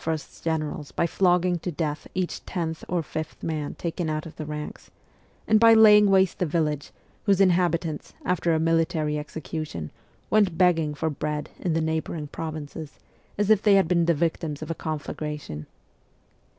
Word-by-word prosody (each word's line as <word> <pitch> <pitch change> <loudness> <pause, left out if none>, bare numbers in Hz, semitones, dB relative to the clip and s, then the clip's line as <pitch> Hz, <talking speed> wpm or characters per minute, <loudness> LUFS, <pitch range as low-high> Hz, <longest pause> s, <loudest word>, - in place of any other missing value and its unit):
's 160 -2 -4
generals 155 -2 -2
by - - 0
flogging 180 0 +2
to 180 - -4
death 150 -2 -3
each 185 -1 -2
tenth 160 -3 -4
or 175 -2 0
fifth 155 +1 -6
man 155 -3 -3
taken 170 -1 -3
out 155 0 -2
of 165 - -10
the 155 - -6
ranks, 150 0 -6 0.6
and 215 0 +5
by 230 0 +7
laying 210 -2 +8
waste 190 -1 +3
the 180 - +2
village, 150 -2 -1 0.4
whose 195 -2 +4
inhabitants, 170 -4 +1
after 175 -1 +1
a 160 - +2
military 160 -2 +1
execution, 150 - -6 0.4
went 205 -6 +3
begging 165 -5 +3
for 160 +2 -1
bread 150 +1 -3
in 175 - -1
the 165 - +1
neighbouring 160 0 -2
provinces, 155 0 -6 0.4
as 205 +1 +2
if 210 -2 +5
they 205 -2 +5
had 195 -3 +4
been 170 0 +3
the 170 - +4
victims 160 -1 -2
of 155 - -5
a - - +1
conflagration. 150 - -5
160 Hz, 165 wpm, -25 LUFS, 155-180 Hz, 0.6 s, laying